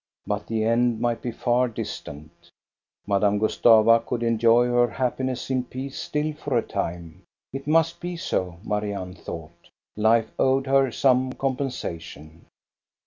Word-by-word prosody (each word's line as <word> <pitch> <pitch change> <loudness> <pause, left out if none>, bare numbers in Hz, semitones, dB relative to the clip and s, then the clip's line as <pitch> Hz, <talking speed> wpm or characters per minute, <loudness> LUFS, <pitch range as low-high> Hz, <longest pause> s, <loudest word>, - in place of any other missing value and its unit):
But 105 0 -3
the 110 -1 -1
end 115 0 +2
might 120 0 -1
be 120 - -3
far 120 +2 +1
distant 75 -9 -7 0.7
Madame 100 0 +2
Gustava 110 +1 +5
could 120 0 -3
enjoy 115 +1 +4
her 120 0 +3
happiness 130 +1 -2
in 130 -1 +1
peace 130 +2 -7
still 150 +1 -2
for 145 -4 -2
a 115 - +1
time. 85 -2 -5 0.3
It 135 +1 -6
must 165 +1 +2
be 175 0 -5
so, 90 - -2
Marianne 100 -4 -3
thought 85 -1 -10 0.3
Life 110 +1 +2
owed 135 0 +2
her 135 -1 +3
some 130 0 +2
compensation. 85 - -5
115 Hz, 140 wpm, -24 LUFS, 105-130 Hz, 0.7 s, Gustava